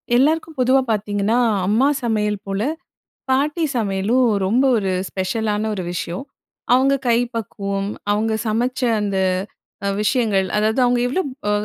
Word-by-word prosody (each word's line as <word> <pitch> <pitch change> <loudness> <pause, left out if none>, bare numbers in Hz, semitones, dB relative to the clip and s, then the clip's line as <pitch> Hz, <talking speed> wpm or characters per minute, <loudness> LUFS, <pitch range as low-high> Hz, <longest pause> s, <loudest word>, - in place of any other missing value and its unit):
எல்லாருக்கும் 315 +4 +1
பொதுவா 260 +1 +4
பார்த்தீங்கன்னா, 205 +1 0 0.3
அம்மா 225 +7 +3 0.2
சமையல் 210 -3 -1
போல 195 +1 -2 0.7
பாட்டி 295 +5 +1
சமையலும் 215 +3 +1 0.2
ரொம்ப 235 +8 +2
ஒரு 195 -3 0 0.2
ஸ்பெஷலான 210 +2 -1
ஒரு 190 - -4
விஷயம். 175 +6 -4 0.5
அவுங்க 270 +2 +4
கை 235 -1 +4 0.2
பக்குவம் 200 -3 -3 0.2
அவுங்க 220 +2 0
சமைச்ச 240 +4 -1 0.2
அந்த 200 -2 -1 0.7
அ - - +1
விஷயங்கள், 210 -5 +1
அதாவது 220 +4 +1
அவுங்க 245 0 +2
எவ்ளோ 275 +10 0 0.3
அ - - +2
220 Hz, 130 wpm, -20 LUFS, 200-255 Hz, 0.7 s, பொதுவா